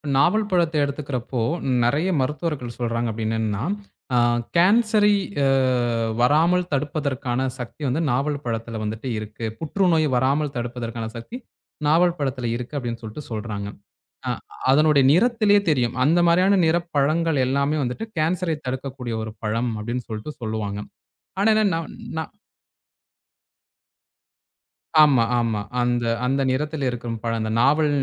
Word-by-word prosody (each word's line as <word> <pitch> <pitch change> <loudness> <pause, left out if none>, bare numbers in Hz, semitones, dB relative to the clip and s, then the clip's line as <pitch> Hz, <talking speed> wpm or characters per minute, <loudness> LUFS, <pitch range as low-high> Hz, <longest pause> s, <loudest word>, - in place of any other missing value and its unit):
நாவல் 210 +9 +3
பழத்தை 170 -4 +2
எடுத்துக்கிறப்போ 135 -4 -3 0.4
நிறைய 150 +10 +1
மருத்துவர்கள் 135 -3 -3
சொல்றாங்க 115 -1 -1
அப்படின்னு 110 0 -2
என்னன்னா, 105 -1 -1 0.5
அ - - +4 0.4
கேன்சரை 210 +3 +4 0.3
அ - - +4 0.7
வராமல் 170 +7 +3
தடுப்பதற்கான 135 -3 -1
சக்தி 125 +5 -8
வந்து 135 +6 0
நாவல் 140 +3 -1
பழத்துல 115 -1 -3
வந்துட்டு 110 +4 -4
இருக்கு. 110 +2 -6
புற்றுநோய் 165 -1 +2
வராமல் 140 +3 +1
தடுப்பதற்கான 120 -1 -4
சக்தி 115 - -7 0.5
நாவல் 170 +3 +3
பழத்துல 130 -3 -2
இருக்கு 125 +4 -6
அப்படின்னு 120 -3 -4
சொல்ட்டு 110 +7 -7
சொல்றாங்க. 105 -2 -4 0.6
அ - - +1 0.4
அதனுடைய 150 0 +5
நிறத்திலேயே 210 +1 +4
தெரியும். 125 -5 +1
அந்த 165 +5 +4
மாதிரியான 185 +3 +4
நிறப் 170 +1 0
பழங்கள் 155 +2 +2
எல்லாமே 140 +3 +1
வந்துட்டு 125 - -3
கேன்சரை 165 0 0
தடுக்கக்கூடிய 130 -2 -4
ஒரு 110 - -5
பழம் 115 +3 0
அப்படின்னு 120 +3 -4
சொல்ட்டு 110 +7 -5
சொல்லுவாங்க. 105 -2 -3 0.6
ஆனா 205 - +3
என்ன 215 0 +3
நம் 165 0 -4 0.2
நான் 160 - -5 2.7
ஆமா, 135 -6 +5 0.2
ஆமா. 110 -3 0 0.2
அந்த 120 0 +1 0.2
அந்த 135 +2 +1
நிறத்தில் 150 +2 -2
இருக்கும் 120 -1 -4
பழம் 115 -1 -1
அந்த 110 0 -2
நாவல் 150 +4 +4
135 Hz, 125 wpm, -23 LUFS, 120-160 Hz, 2.7 s, அதனுடைய